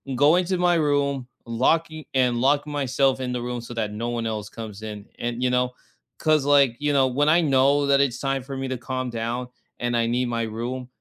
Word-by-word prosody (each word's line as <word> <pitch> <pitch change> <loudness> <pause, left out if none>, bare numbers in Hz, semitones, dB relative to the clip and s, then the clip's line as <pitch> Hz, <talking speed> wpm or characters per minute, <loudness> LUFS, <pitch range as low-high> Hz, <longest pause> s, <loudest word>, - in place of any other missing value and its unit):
going 155 +7 +4
to 185 +1 0
my 175 0 +3
room, 140 -4 +1 0.2
locking 155 +7 0
and 125 -2 +2
lock 145 +3 +2
myself 135 -2 +1
in 125 -1 -2
the 125 - -2
room 120 0 -3
so 120 +1 -9
that 110 -3 -2
no 115 +3 -3
one 120 -1 -2
else 105 -2 -4
comes 110 -2 -8
in, 105 -1 -7
and, 120 +1 -3
you 125 - +3
know 125 0 +1 0.5
'cause, 155 -3 +2
like, 140 -4 +4
you 145 0 0
know, 135 -1 +4
when 145 +4 +1
I 170 +3 +5
know 140 -1 +3
that 140 0 +4
it's 130 -4 +1
time 135 -2 -1
for 135 0 -7
me 135 0 -3
to 130 -1 -3
calm 130 +1 -4
down 120 +2 -3 0.3
and 120 0 0
I 115 - +2
need 125 +1 0
my 115 -1 -1
room, 120 +3 -4
130 Hz, 225 wpm, -24 LUFS, 120-145 Hz, 0.5 s, I